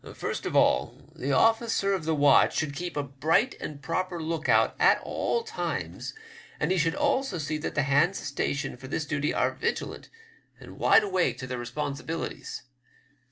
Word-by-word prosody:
First -, -, -3 dB
of -, -, -4 dB
all, 65 Hz, -, +3 dB, 0.2 s
the 140 Hz, -, -2 dB
officer 225 Hz, -, +3 dB
of 185 Hz, -5 st, -2 dB
the 160 Hz, 0 st, +1 dB
watch 145 Hz, -1 st, +5 dB
should 150 Hz, -3 st, -1 dB
keep 175 Hz, -1 st, -5 dB
a 145 Hz, -, 0 dB
bright 150 Hz, -, +1 dB
and 145 Hz, -2 st, -7 dB
proper 185 Hz, +5 st, -2 dB
look 160 Hz, 0 st, -3 dB
out -, -, +4 dB
at -, -, +5 dB
all 470 Hz, -, -1 dB
times, 450 Hz, -1 st, -4 dB, 0.4 s
and -, -, 0 dB
he 190 Hz, -, +2 dB
should 165 Hz, +1 st, +1 dB
also 265 Hz, -8 st, 0 dB
see 155 Hz, 0 st, -3 dB
that 150 Hz, -, -4 dB
the 145 Hz, -, +2 dB
hands 145 Hz, +7 st, +3 dB
stationed 140 Hz, -2 st, -3 dB
for 130 Hz, -, -9 dB
this 155 Hz, +3 st, -2 dB
duty 150 Hz, 0 st, -1 dB
are -, -, +1 dB
vigilant, -, -, -3 dB, 0.5 s
and -, -, -12 dB
wide -, -, +6 dB
awake 180 Hz, -, +1 dB
to 130 Hz, -, -6 dB
their 125 Hz, -1 st, -4 dB
responsibilities. 145 Hz, +3 st, -5 dB
155 Hz, 175 wpm, -27 LUFS, 140-180 Hz, 0.5 s, wide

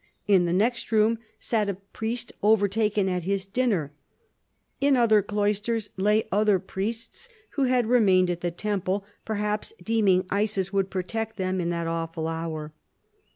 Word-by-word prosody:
In 190 Hz, -4 st, +5 dB
the 170 Hz, -, 0 dB
next 230 Hz, +8 st, 0 dB
room 220 Hz, +1 st, +3 dB, 0.2 s
sat 215 Hz, -3 st, 0 dB
a 200 Hz, -, -1 dB
priest 220 Hz, +5 st, -5 dB
overtaken 210 Hz, -1 st, +2 dB
at 180 Hz, -1 st, 0 dB
his 195 Hz, +2 st, -1 dB
dinner. 195 Hz, -, 0 dB, 0.9 s
In 280 Hz, -1 st, +4 dB
other 220 Hz, -3 st, +5 dB
cloisters 210 Hz, +2 st, -1 dB
lay 210 Hz, +3 st, +2 dB
other 210 Hz, 0 st, +3 dB
priests, 225 Hz, -, -5 dB, 0.2 s
who 275 Hz, -, +1 dB
had 250 Hz, -2 st, +2 dB
remained 195 Hz, -6 st, +4 dB
at 175 Hz, 0 st, -4 dB
the 175 Hz, -, 0 dB
temple, 195 Hz, +1 st, -2 dB, 0.2 s
perhaps 210 Hz, -, -2 dB
deeming 200 Hz, -5 st, +3 dB
Isis 200 Hz, -2 st, 0 dB
would 195 Hz, -1 st, +1 dB
protect 220 Hz, +4 st, -3 dB
them 185 Hz, -1 st, -1 dB
in 170 Hz, -, -1 dB
that 170 Hz, -1 st, -2 dB
awful 165 Hz, -1 st, -3 dB
hour. 160 Hz, -2 st, -4 dB
205 Hz, 150 wpm, -26 LUFS, 185-220 Hz, 0.9 s, In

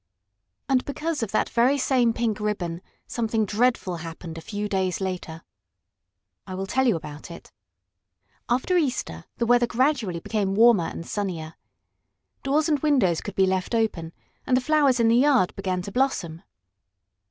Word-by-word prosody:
And 260 Hz, -2 st, +2 dB
because 305 Hz, +2 st, -3 dB
of 225 Hz, -, -2 dB
that 215 Hz, -, +1 dB
very 245 Hz, +4 st, +2 dB
same 255 Hz, -3 st, +2 dB
pink 225 Hz, -2 st, -1 dB
ribbon 185 Hz, -5 st, -3 dB, 0.2 s
something 225 Hz, -2 st, -1 dB
dreadful 210 Hz, -4 st, 0 dB
happened 165 Hz, 0 st, -8 dB
a 165 Hz, -, -7 dB
few 210 Hz, +3 st, -4 dB
days 190 Hz, -3 st, -1 dB
later. 180 Hz, -4 st, -5 dB, 1.0 s
I 185 Hz, -, -6 dB
will 190 Hz, +1 st, -3 dB
tell 265 Hz, +6 st, +1 dB
you 230 Hz, -, +3 dB
about 150 Hz, -1 st, -8 dB
it. 170 Hz, -, -11 dB, 1.0 s
After 255 Hz, +9 st, +1 dB
Easter 250 Hz, -, -2 dB
the 235 Hz, -, 0 dB
weather 240 Hz, 0 st, +4 dB
gradually 235 Hz, -, 0 dB
became 195 Hz, +1 st, -1 dB
warmer 225 Hz, -5 st, +5 dB
and 165 Hz, -, -6 dB
sunnier. 170 Hz, -6 st, -4 dB, 0.9 s
Doors 295 Hz, +4 st, +1 dB
and 300 Hz, -3 st, +1 dB
windows 255 Hz, -, +2 dB
could 205 Hz, -, -7 dB
be 190 Hz, -, +4 dB
left 190 Hz, +4 st, -1 dB
open, 185 Hz, -8 st, -1 dB, 0.4 s
and 255 Hz, -, +3 dB
the -, -, +1 dB
flowers 280 Hz, -2 st, +3 dB
in 230 Hz, -, +4 dB
the 230 Hz, +1 st, +4 dB
yard 260 Hz, -8 st, +3 dB
began 185 Hz, -2 st, -2 dB
to 200 Hz, -, -7 dB
blossom. 195 Hz, -10 st, -1 dB
215 Hz, 160 wpm, -25 LUFS, 180-255 Hz, 1.0 s, warmer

